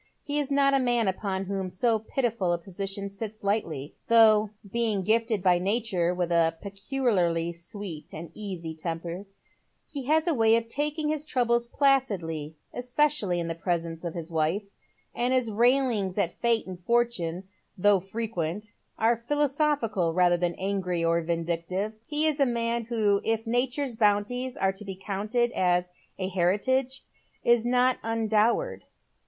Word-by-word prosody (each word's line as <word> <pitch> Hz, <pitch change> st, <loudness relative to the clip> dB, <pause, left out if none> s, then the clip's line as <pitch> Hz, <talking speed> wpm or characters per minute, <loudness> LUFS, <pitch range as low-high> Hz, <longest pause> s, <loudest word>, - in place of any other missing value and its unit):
He 290 Hz, 0 st, -1 dB
is 290 Hz, -2 st, -2 dB
not 275 Hz, 0 st, +3 dB
a -, -, +5 dB
n 255 Hz, -2 st, 0 dB
.an 240 Hz, -3 st, +2 dB
upon 190 Hz, 0 st, -2 dB
whom 190 Hz, -1 st, -3 dB
so 220 Hz, +5 st, +1 dB
pitiful 220 Hz, -5 st, -1 dB
a -, -, +1 dB
position 195 Hz, +3 st, -5 dB
sits 210 Hz, +2 st, -7 dB
lightly; 170 Hz, -9 st, -2 dB
though 220 Hz, -2 st, +6 dB
— 200 Hz, -, -17 dB
being 225 Hz, -4 st, +1 dB
gifted 220 Hz, -1 st, +1 dB
by 180 Hz, -2 st, +4 dB
nature 195 Hz, -3 st, 0 dB
with 180 Hz, -1 st, -2 dB
a 165 Hz, -1 st, +3 dB
peculiarly 195 Hz, -6 st, 0 dB
sweet 170 Hz, -1 st, -6 dB
and 160 Hz, +1 st, -8 dB
eaay 180 Hz, -6 st, -6 dB
temper 170 Hz, +4 st, -5 dB, 0.3 s
— -, -, -45 dB
he 275 Hz, -3 st, -4 dB
has 315 Hz, +3 st, +2 dB
a 340 Hz, -, +2 dB
way 225 Hz, -3 st, +4 dB
of 230 Hz, 0 st, 0 dB
taking 300 Hz, +4 st, -1 dB
his 305 Hz, -1 st, -1 dB
troubles 240 Hz, -5 st, +1 dB
placidly, 195 Hz, -, 0 dB, 0.2 s
especially 250 Hz, -7 st, 0 dB
in 170 Hz, -, -2 dB
the 165 Hz, -, -2 dB
presence 165 Hz, -1 st, -3 dB
of 170 Hz, -1 st, -4 dB
hia 170 Hz, -, -3 dB
wife, 165 Hz, +6 st, -1 dB, 0.4 s
and 245 Hz, +2 st, +1 dB
hia 235 Hz, -4 st, 0 dB
railings 235 Hz, -5 st, +2 dB
at 180 Hz, -4 st, +1 dB
Fate 230 Hz, +1 st, +1 dB
and 185 Hz, -2 st, -8 dB
Fortune, 190 Hz, -6 st, 0 dB, 0.3 s
though 200 Hz, +1 st, +5 dB
fi 195 Hz, +5 st, -6 dB
equent, 200 Hz, +2 st, -4 dB, 0.3 s
are 225 Hz, +2 st, +3 dB
philosophical 275 Hz, -, 0 dB
rather 180 Hz, -1 st, +4 dB
than 175 Hz, -1 st, -1 dB
angry 185 Hz, -3 st, -1 dB
or 170 Hz, 0 st, +2 dB
vindictive. 170 Hz, +5 st, -2 dB
He 300 Hz, +1 st, +1 dB
is 310 Hz, -2 st, +1 dB
a 275 Hz, -, +5 dB
man 235 Hz, -1 st, -1 dB
who, 215 Hz, -4 st, +1 dB
if 225 Hz, 0 st, -1 dB
Nature's 245 Hz, +2 st, 0 dB
bounties 230 Hz, +4 st, +1 dB
are 190 Hz, 0 st, +1 dB
to 195 Hz, +2 st, -4 dB
be 195 Hz, -2 st, -6 dB
counted 210 Hz, +5 st, -1 dB
as 180 Hz, -2 st, +1 dB, 0.3 s
a 185 Hz, -, -2 dB
heritage, 210 Hz, +9 st, +1 dB, 0.4 s
is 235 Hz, 0 st, +3 dB
not 250 Hz, +1 st, +3 dB
undowered. 225 Hz, -, +1 dB
210 Hz, 160 wpm, -27 LUFS, 180-240 Hz, 0.4 s, though